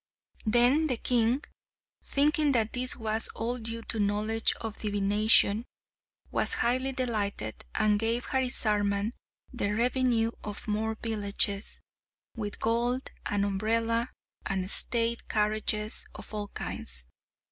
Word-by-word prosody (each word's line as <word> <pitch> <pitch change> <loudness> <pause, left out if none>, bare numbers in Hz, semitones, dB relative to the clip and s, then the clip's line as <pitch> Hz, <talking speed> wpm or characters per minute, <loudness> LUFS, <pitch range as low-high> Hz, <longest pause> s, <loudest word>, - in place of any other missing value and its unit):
Then 245 +8 +4
the 250 -5 -1
king, 240 +3 +1 0.6
thinking 295 +1 +2
that 225 -3 0
this 250 0 +2
was 220 -1 +1
all 240 +2 -2
due 230 0 -4
to 225 - 0
knowledge 210 +2 +1
of 225 -2 -6
divination, 205 +1 +5 0.7
was - - +3
highly 255 +3 0
delighted, 210 - -3
and 210 -1 +2
gave 230 +2 0
Harisarman 210 -5 0 0.4
the 210 -4 -1
revenue 240 -1 +1
of 210 +1 -6
more 220 +1 -2
villages, 205 -2 +1 0.5
with 210 -3 -6
gold, 240 +3 0 0.2
an 205 -1 -1
umbrella, 230 +4 -1 0.3
and 190 0 0
state 235 0 +3
carriages 215 0 0
of - - -9
all 210 -1 -3
kinds. - - -5
225 Hz, 115 wpm, -28 LUFS, 210-240 Hz, 0.7 s, divination